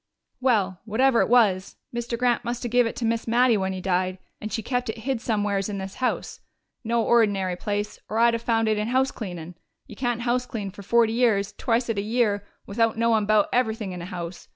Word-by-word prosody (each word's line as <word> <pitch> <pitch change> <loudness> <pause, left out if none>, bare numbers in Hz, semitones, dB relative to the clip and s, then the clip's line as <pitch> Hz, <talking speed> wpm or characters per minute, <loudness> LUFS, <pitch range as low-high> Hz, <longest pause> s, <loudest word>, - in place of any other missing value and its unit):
"Well, 205 -8 +1
whatever 235 +3 +3
it - - +1
was, 205 -6 +3 0.2
Mr. 235 0 -3
Grant 245 0 +1
must 240 +1 -4
have 240 - -3
give 245 -1 +4
it - - -5
to 240 - -3
Miss 230 0 -1
Mattie 240 +1 +4
when 190 -2 -1
he 190 - -4
died, 185 0 0 0.2
and 215 - -5
she 225 - -2
kept 245 0 -2
it 220 - -4
hid 250 +1 -2
somewheres 205 -3 0
in 200 - -3
this 190 0 -6
house. 255 - -2 0.4
No 230 0 +1
ordinary 205 -6 +2
place, 205 +2 -3
or 220 - -2
I'd 235 +1 +5
have 230 - -2
found 225 -1 +1
it 215 -1 +1
in 210 - -1
house 260 +2 +2
cleanin'. 175 -5 -7 0.3
You 215 - -12
can't 240 0 -1
houseclean 240 -4 -2
for 200 - -10
forty 225 +2 +3
years, 210 -4 +2
twicet 230 -1 0
a - - 0
year, 210 -2 0 0.2
without 225 +2 0
knowin' 225 -2 +2
'bout 215 -1 +4
everything 220 -5 0
in 180 -1 -6
a - - -6
house.... 175 -1 -7
225 Hz, 215 wpm, -25 LUFS, 200-240 Hz, 0.4 s, I'd